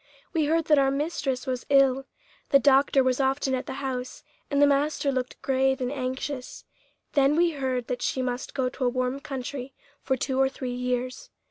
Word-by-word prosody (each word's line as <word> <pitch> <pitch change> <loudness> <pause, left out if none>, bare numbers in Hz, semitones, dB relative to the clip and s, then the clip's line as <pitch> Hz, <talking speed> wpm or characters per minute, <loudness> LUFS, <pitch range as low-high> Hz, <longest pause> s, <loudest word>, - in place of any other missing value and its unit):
We 320 -3 +2
heard 325 +1 +1
that 300 -2 +5
our 270 -1 +3
mistress 275 -2 -2
was 255 -2 -3
ill. 270 -1 +4 0.4
The 275 - +7
doctor 275 -1 +4
was 255 0 +1
often 270 0 +1
at 255 0 -2
the - - -4
house, 255 -1 -4 0.3
and 280 - +1
the 290 - +7
master 285 0 +1
looked 255 -1 -3
grave 265 0 +2
and 250 0 -2
anxious. 260 0 -4 0.5
Then 280 +1 +4
we 340 +1 +3
heard 260 -4 -2
that 245 0 -4
she 260 - -1
must 250 +1 -4
go 260 -2 +1
to 255 +1 -3
a - - +4
warm 255 +2 -1
country 265 -1 -6 0.3
for 265 -1 0
two 265 0 -1
or 265 - +4
three 255 -2 -5
years. 250 0 -3
265 Hz, 195 wpm, -26 LUFS, 255-280 Hz, 0.5 s, The